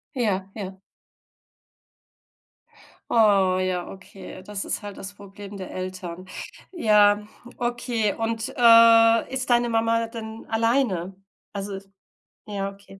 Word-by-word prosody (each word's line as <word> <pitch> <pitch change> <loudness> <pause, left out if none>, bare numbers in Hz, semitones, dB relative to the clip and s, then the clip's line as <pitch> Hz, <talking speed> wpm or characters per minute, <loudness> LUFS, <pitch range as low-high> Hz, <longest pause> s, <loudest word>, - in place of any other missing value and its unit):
Ja, 195 -6 -1
ja. 190 -2 -7 2.3
Oh 195 -5 +4
ja, 185 -1 -2
okay. 190 -1 -11
Das 205 0 -5
ist - - -3
halt 205 -1 -8
das 195 +1 -8
Problem 200 0 -11
der 190 - -8
Eltern. 185 -1 -6 0.5
Ja, 210 - +3 0.3
okay. 240 -3 -1
Und, 225 0 -3
äh, 230 0 +6
ist 260 -1 -2
deine 240 0 +3
Mama 230 0 +1
denn 225 -1 -8
alleine? 225 -6 0 0.4
Also, 200 0 -5
ist 195 0 -11 0.6
ja, 200 -1 -3
okay. 195 -1 -16
205 Hz, 115 wpm, -24 LUFS, 195-230 Hz, 2.3 s, äh